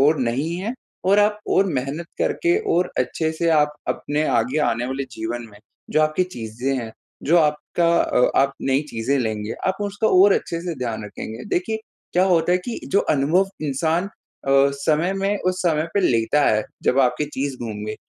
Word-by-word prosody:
और 150 +3 +4
नहीं 135 +7 -1
है 205 +5 -3 0.3
और 195 +2 +4
आप 210 0 +3
और 195 - +4
मेहनत 140 +6 -4
करके 345 +1 +1 0.2
और 180 +1 +1
अच्छे 160 -1 0
से 165 +1 -1
आप 150 -1 +3
अपने 150 +1 -1
आगे 125 +6 +1
आने 120 +2 0
वाले 135 +1 -3
जीवन 115 +2 -4
में 105 - -16 0.3
जो 155 - +3
आपकी 155 +3 +2
चीज़ें 120 +4 -3
हैं, 115 -2 -6 0.3
जो 170 +4 +3
आपका 155 +2 +1
अ, 125 - +2
आप 135 0 +2
नई 135 +2 +1
चीज़ें 115 +5 0
लेंगे, 110 -3 -2
आप 190 0 +1
उसको 205 +2 0 0.2
और 205 - +6
अच्छे 170 0 -2
से 175 -1 -4
ध्यान 115 -4 -3
रखेंगे। 110 +3 -7
देखिए 185 +5 0 0.4
क्या 180 +2 +4
होता 175 -2 +3
है 180 - +3
कि 235 - -4
जो 200 - +5 0.2
अनुभव 170 +8 +2 0.2
इंसान 160 +6 0 0.4
अ, - - +3 0.3
समय 160 +5 +1
में 195 +1 0
उस 185 0 -1
समय 160 -2 +1
पे 200 - +3
लेता 120 +5 +2
है, 110 0 +2 0.2
जब 130 - +2
आपकी 125 +3 +2
चीज़ 135 0 -2
गुम 105 -2 -5
गई, 110 - -3
150 Hz, 190 wpm, -22 LUFS, 125-180 Hz, 0.4 s, और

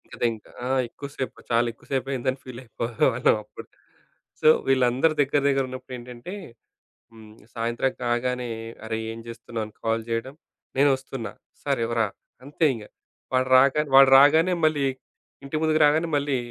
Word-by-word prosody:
ఇదింక 115 -2 -2 0.2
ఆ! - - -2 0.2
ఎక్కువ 140 - -8
సేపు. 130 - -4
చాలా 120 +1 +3
ఎక్కువ - - -23
సేపయిందని 130 0 -1
ఫీలయిపోయెవాళ్ళం 120 -1 0
అప్పుడు - - -12 0.7
సో, - - +3 0.2
వీళ్ళందరూ 130 +4 +3
దగ్గర 140 +1 +1
దగ్గరున్నప్పుడేంటంటే 130 +1 -4 0.8
హ్మ్. 110 -1 -14 0.2
సాయంత్రం 120 +3 -1
కాగానే 125 +1 -1 0.4
"అరే! 110 0 -3 0.2
ఏం 115 - -9
చేస్తున్నావు?" 115 -1 -5
అని 110 - -16
కాల్ 115 0 0
జేయడం, 115 +4 -3 0.4
"నేనొస్తున్న!" 135 -3 +1 0.4
"సరే 135 -5 0
రా!" 110 - +3 0.4
అంతే 150 +4 -1
ఇంగ! 110 -2 -8 0.5
వాడు 130 0 +2
రాగానె 140 +3 +4
వాడు 135 0 +8
రాగానే 160 +6 +5
మళ్ళీ, 150 -3 +2 0.6
ఇంటి 140 +3 -4
ముందుకు 155 0 +2
రాగానే 155 +3 +3
మళ్ళీ 140 -1 0
130 Hz, 130 wpm, -25 LUFS, 115-140 Hz, 0.8 s, వాడు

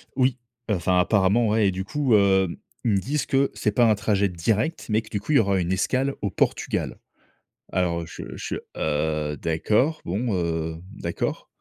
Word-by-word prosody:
Oui, 130 -1 +2 0.3
heu, 105 - +3
enfin, 90 +1 +2
apparemment, 100 +4 +3
ouais 110 -1 +3
et - - +2
du 95 +1 -3
coup, 130 +3 +1
hem, 95 -3 +3 0.3
ils 115 - +3
me 100 - +3
disent 135 +7 -1
que 135 0 +2
c'est 105 - 0
pas 120 +4 +4
un 110 - +4
trajet 100 -1 +1
direct, 110 - -1
mais 110 +1 +2
que 110 - -15
du 105 - -2
coup, 130 +10 -2
il - - +4
y - - +7
aura 100 -3 +2
une 90 0 -1
escale 130 +8 0
au 100 - 0
Portugal. 90 - -1 0.8
Alors 85 -2 0
je - - -9
je - - -4 0.2
heu, 75 0 -1
d'accord, 110 - +1
bon, 105 +5 -1
heu, 80 -2 -2
d'accord. - - -3
100 Hz, 190 wpm, -24 LUFS, 90-115 Hz, 0.8 s, y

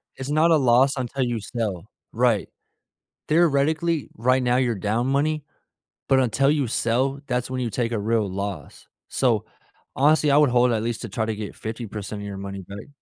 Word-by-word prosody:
it's 135 +1 -6
not 155 +3 +3
a 160 - +6
loss 130 +1 +4
until 130 +1 -2
you 120 -2 -1
sell, 105 -4 -4 0.2
right? 115 -3 +1 0.8
Theoretically, 160 0 +2
right 130 +3 +2
now 125 0 +2
you're 120 -3 +1
down 110 +6 -1
money, 150 +2 0 0.6
but 135 -1 +4
until 130 +3 +2
you 145 -5 +1
sell, 130 +5 0
that's 125 -2 -1
when 130 0 -3
you 120 - -1
take 115 +2 -2
a 115 - -1
real 110 -1 0
loss, 95 -5 -6 0.2
so, - - +1 0.5
honestly, 150 +1 +3
I 140 - +5
would 150 -2 +5
hold 125 0 +3
at 110 - -1
least 115 -1 -3
to - - -5
try 110 -2 -2
to 110 -1 -2
get 105 -1 -7
50% 110 -2 -6
of 100 - -6
your 100 -1 -6
money 100 0 -6
back. 100 +6 -10
120 Hz, 190 wpm, -24 LUFS, 110-140 Hz, 0.8 s, a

